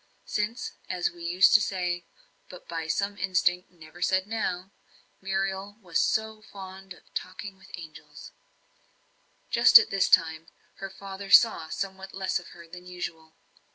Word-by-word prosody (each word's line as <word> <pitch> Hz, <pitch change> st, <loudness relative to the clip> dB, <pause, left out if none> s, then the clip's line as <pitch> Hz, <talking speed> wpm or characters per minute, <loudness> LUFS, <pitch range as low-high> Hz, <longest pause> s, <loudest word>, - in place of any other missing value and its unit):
Since, 210 Hz, +3 st, -2 dB, 0.2 s
as 180 Hz, -1 st, 0 dB
we 175 Hz, -, -15 dB
used 180 Hz, +3 st, +5 dB
to 215 Hz, -, +7 dB
say 180 Hz, -3 st, -2 dB, 0.4 s
but 180 Hz, -, -12 dB
by 165 Hz, -1 st, -4 dB
some 200 Hz, +5 st, -1 dB
instinct 180 Hz, -1 st, +1 dB
never 170 Hz, 0 st, -15 dB
said 185 Hz, +1 st, +2 dB
now 195 Hz, -4 st, -3 dB, 0.5 s
Muriel 195 Hz, +1 st, -2 dB
was 180 Hz, -6 st, -1 dB
so 220 Hz, 0 st, 0 dB
fond 190 Hz, -2 st, -10 dB
of -, -, -24 dB
"talking 190 Hz, +2 st, -6 dB
with 190 Hz, 0 st, -18 dB
the -, -, -9 dB
angels." 160 Hz, -2 st, -12 dB, 1.2 s
Just -, -, +9 dB
at 455 Hz, -, +3 dB
this 195 Hz, -1 st, +2 dB
time, 165 Hz, -2 st, +3 dB, 0.3 s
her 195 Hz, -, -6 dB
father 195 Hz, 0 st, -9 dB
saw 195 Hz, -9 st, +6 dB
somewhat 190 Hz, +2 st, -5 dB
less 190 Hz, -1 st, -1 dB
of 175 Hz, -, -13 dB
her 170 Hz, -1 st, -13 dB
than 180 Hz, +2 st, -12 dB
usual. 160 Hz, -3 st, -7 dB
190 Hz, 155 wpm, -27 LUFS, 175-195 Hz, 1.2 s, Just